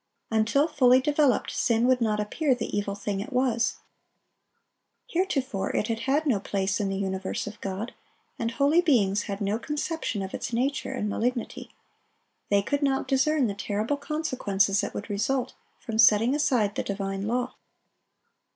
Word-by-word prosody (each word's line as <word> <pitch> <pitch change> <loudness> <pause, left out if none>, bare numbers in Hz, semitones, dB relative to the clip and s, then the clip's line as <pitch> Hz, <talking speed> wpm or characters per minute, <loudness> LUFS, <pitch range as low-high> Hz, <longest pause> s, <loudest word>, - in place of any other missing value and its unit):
Until 225 +7 +3
fully 255 -5 +5
developed, 290 -1 +2
sin 230 0 +1
would 255 -1 +3
not 215 -2 +1
appear 260 +7 +1
the 230 -3 -4
evil 200 -1 -1
thing 200 -1 -3
it 215 +8 -6
was. 250 -2 +1 1.3
Heretofore 275 - -1
it 210 - 0
had 225 -1 -1
had 275 +6 +1
no 245 -9 +2
place 195 0 -1
in 200 -2 0
the 195 - -2
universe 190 -1 -3
of 205 0 -9
God, 200 +5 -4 0.5
and 230 - 0
holy 285 +8 +3
beings 210 - +3
had 200 +1 -4
no 205 +2 0
conception 295 - -3
of 190 - -7
its - - -4
nature 265 +5 -1
and 255 -5 -2
malignity. 240 +3 -2 0.8
They 200 -1 +3
could 285 +7 -1
not 275 -1 +1
discern 275 +1 +2
the 205 - -1
terrible 210 +6 -2
consequences 255 -10 0
that - - -5
would 205 - -5
result 240 +5 -1 0.3
from 225 -3 -4
setting 225 +2 +6
aside 250 -8 +2
the - - -2
divine 195 0 -3
law. 245 +2 -1
230 Hz, 160 wpm, -27 LUFS, 205-270 Hz, 1.3 s, setting